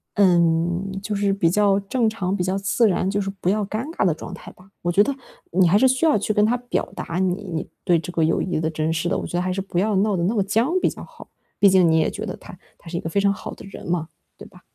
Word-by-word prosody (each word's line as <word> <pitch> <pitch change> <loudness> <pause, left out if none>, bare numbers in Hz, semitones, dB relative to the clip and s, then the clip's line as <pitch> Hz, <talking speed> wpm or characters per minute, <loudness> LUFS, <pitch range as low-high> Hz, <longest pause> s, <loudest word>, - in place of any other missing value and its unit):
嗯， 175 -1 +2
就 210 +1 -3
是 200 0 +1
比 175 -4 +2
较 200 +1 +3
正 225 +4 0
常、 200 -3 -2
比 180 - -1
较 185 +2 -1
自 200 +4 +2
然， 185 0 0
就 205 +1 0
是 195 - -3
不 180 - +1
要 210 +1 +1
尴 215 +6 -4
尬 215 - 0
的 175 - +3
状 160 - -9
态 - - -10
吧。 185 +1 -20
我 175 - +1
觉 195 - +4
得， 280 +4 -2 0.4
你 180 +1 +4
还 195 - +5
是 260 +5 +5
需 260 +5 +1
要 310 -6 +4
去 210 +1 -1
跟 210 0 +3
他 240 +3 +1
表 245 0 -3
达 170 - -4
你 185 +1 0
你 160 - -3 0.2
对 175 -3 +4
这 165 +3 -7
个 165 -2 0
友 165 - +1
谊 180 -4 -1
的 160 0 0
珍 155 0 -1
视 165 +1 -1
的， 195 - 0
我 - - -4
觉 175 - -3
得 - - +1
还 185 +1 -1
是 195 - -2
不 185 -2 -2
要 210 +2 +1
闹 200 0 +2
得 170 - -1
那 210 +6 0
么 200 - +2
僵 235 - +1
比 - - +3
较 - - -9
好。 - - -14 0.3
毕 200 - +6
竟 185 -3 +5
你 160 - +3
也 - - +1
觉 - - -6
得 - - -6
他 - - -12 0.2
他 - - -20
是 170 - -3
一 - - -1
个 160 - -5
非 200 - 0
常 200 0 +3
好 - - -8
的 - - -12
人 195 - -10
嘛， 170 -2 -1 0.3
对 - - -11
吧？ - - -18
195 Hz, 320 characters per minute, -22 LUFS, 175-210 Hz, 0.4 s, 毕